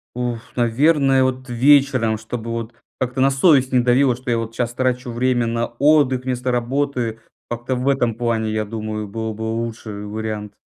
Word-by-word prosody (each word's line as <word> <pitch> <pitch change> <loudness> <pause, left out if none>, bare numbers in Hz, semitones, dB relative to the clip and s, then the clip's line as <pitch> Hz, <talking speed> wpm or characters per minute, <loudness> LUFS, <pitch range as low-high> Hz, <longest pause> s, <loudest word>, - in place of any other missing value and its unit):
Уф, 120 -2 -4
наверное, 135 +3 +3
вот 130 0 -2
вечером, 130 -3 +3
чтобы 115 +1 -6
вот 115 0 -4 0.3
как-то 130 +1 -1
на 135 - +5
совесть 135 -2 +4
не 125 - +4
давило, 125 +1 +3
что 125 -1 -5
я 115 - +2
вот 115 0 -5
щас 120 0 -2
трачу 125 -1 -1
время 120 0 +1
на 115 0 -1
отдых 130 0 +2
вместо 125 0 -2
работы 125 -2 -1 0.3
как-то 120 +2 -3
в 125 +2 -3
этом 120 -5 +1
плане, 115 -2 -1
я 110 0 -1
думаю, 110 -1 -5
был 110 +1 -4
бы 110 +1 -7
лучше 115 0 -4
вариант. 105 0 -5
120 Hz, 175 wpm, -20 LUFS, 115-130 Hz, 0.3 s, на